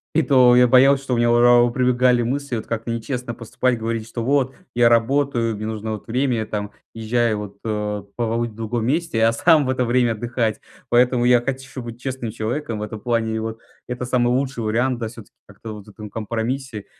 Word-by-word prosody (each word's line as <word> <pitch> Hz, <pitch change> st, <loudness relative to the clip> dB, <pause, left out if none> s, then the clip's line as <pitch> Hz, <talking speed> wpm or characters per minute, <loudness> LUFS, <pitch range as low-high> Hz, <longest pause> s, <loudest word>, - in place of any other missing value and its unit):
И 160 Hz, -, +4 dB
то 125 Hz, -3 st, +5 dB
я 125 Hz, 0 st, +6 dB
боялся, 135 Hz, +2 st, +5 dB
что 135 Hz, -, -2 dB
у 120 Hz, -, +1 dB
меня, 120 Hz, 0 st, +2 dB
о 120 Hz, -, +4 dB
а 120 Hz, 0 st, +6 dB
о -, -, -1 dB
прибегали 125 Hz, -1 st, +2 dB
мысли 135 Hz, +1 st, -2 dB
вот 110 Hz, -, -4 dB
как-то 115 Hz, 0 st, -4 dB
нечестно 120 Hz, +1 st, -4 dB
поступать, 125 Hz, +2 st, -1 dB
говорить, 115 Hz, 0 st, -3 dB
что 115 Hz, 0 st, -5 dB
вот 135 Hz, 0 st, +1 dB, 0.2 s
я 120 Hz, -1 st, +4 dB
работаю, 120 Hz, -1 st, +1 dB
мне 105 Hz, -, -5 dB
нужно 110 Hz, 0 st, -4 dB
вот 105 Hz, -, -8 dB
время, 125 Hz, +1 st, 0 dB
я 110 Hz, -, -2 dB
там 105 Hz, -1 st, -4 dB, 0.2 s
уезжаю 115 Hz, 0 st, 0 dB
вот, 100 Hz, -1 st, -7 dB
э, 105 Hz, -2 st, -3 dB
побыть 120 Hz, 0 st, -1 dB
в 105 Hz, -, -18 dB
другом 115 Hz, 0 st, -3 dB
месте, 145 Hz, -6 st, 0 dB
а 115 Hz, -, +5 dB
сам 155 Hz, +3 st, +4 dB
в 130 Hz, -, -2 dB
это 130 Hz, -1 st, 0 dB
время 120 Hz, -1 st, +2 dB
отдыхать. 115 Hz, 0 st, -2 dB, 0.3 s
Поэтому 120 Hz, 0 st, +3 dB
я 125 Hz, -1 st, +5 dB
хочу 135 Hz, 0 st, -5 dB
быть 115 Hz, +1 st, -9 dB
честным 130 Hz, -4 st, -4 dB
человеком 115 Hz, +2 st, -3 dB
в -, -, -6 dB
этом 105 Hz, 0 st, -6 dB
плане, 115 Hz, -1 st, 0 dB
и -, -, -1 dB
вот. 110 Hz, 0 st, -5 dB, 0.3 s
Это 125 Hz, 0 st, -4 dB
самый 125 Hz, -1 st, +1 dB
лучший 130 Hz, -1 st, -1 dB
вариант, 120 Hz, +3 st, 0 dB
да, 115 Hz, -, -3 dB
всё-таки 115 Hz, -2 st, -12 dB
как-то 110 Hz, -1 st, -9 dB
вот, 105 Hz, -1 st, -11 dB
в 105 Hz, -, -14 dB
ком 105 Hz, -1 st, -9 dB
компромиссе, 115 Hz, +2 st, -4 dB
120 Hz, 220 wpm, -21 LUFS, 110-125 Hz, 0.3 s, я